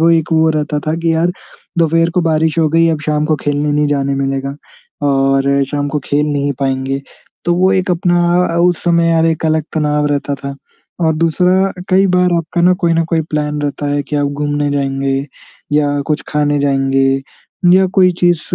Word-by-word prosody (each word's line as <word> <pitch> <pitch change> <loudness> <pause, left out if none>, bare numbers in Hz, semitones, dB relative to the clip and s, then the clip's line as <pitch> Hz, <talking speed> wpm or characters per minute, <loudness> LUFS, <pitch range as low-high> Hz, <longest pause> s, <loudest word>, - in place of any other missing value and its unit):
वो 165 +1 +4
एक 165 0 +1
वो 160 0 +3
रहता 150 -1 -1
था 155 - 0
कि, 165 0 0
"यार, 170 +2 +1 0.5
दोपहर 165 +1 +2
को 180 - 0
बारिश 160 0 +1
हो 160 - +3
गई, 165 +2 +3
अब 160 -2 -1
शाम 150 0 0
को 155 -1 +1
खेलने 145 0 -1
नहीं 150 0 +1
जाने 140 -1 0
मिलेगा। 135 0 -2 0.5
और 135 0 +2
शाम 145 -1 -2
को 150 +1 -2
खेल 145 +1 0
नहीं 145 -1 -1
पाएँगे।" 135 0 -1 0.4
तो 175 - +2
वो 185 +2 +2
एक 185 0 0
अपना 175 0 +1 0.3
अ, 170 - -3
उस 175 -1 +2
समय 170 -1 +2
अर 160 - +3
एक 160 0 -1
अलग 155 0 +1
तनाव 150 -1 0
रहता 145 -1 -1
था। 140 0 -7 0.5
और 160 -2 +2
दूसरा 175 +3 +2
अ, - - -7 0.2
कई 190 +1 +4
बार 180 -1 +2
आपका 170 +1 -2
ना 180 +1 +5
कोई 170 - +3
ना 165 0 +1
कोई 160 - +2
प्लान 150 0 -1
रहता 145 0 -3
है 145 0 0
कि 150 +2 -4
आप 145 0 +1
घूमने 145 0 -2
जाएँगे 135 -1 -1 0.6
या 145 -1 +1
कुछ 150 -1 -1
खाने 145 -1 0
जाएँगे 135 -1 +1 0.5
या 190 0 +5
कोई 185 -1 +6
चीज़ 175 -2 +3
150 Hz, 200 wpm, -15 LUFS, 145-165 Hz, 0.6 s, कोई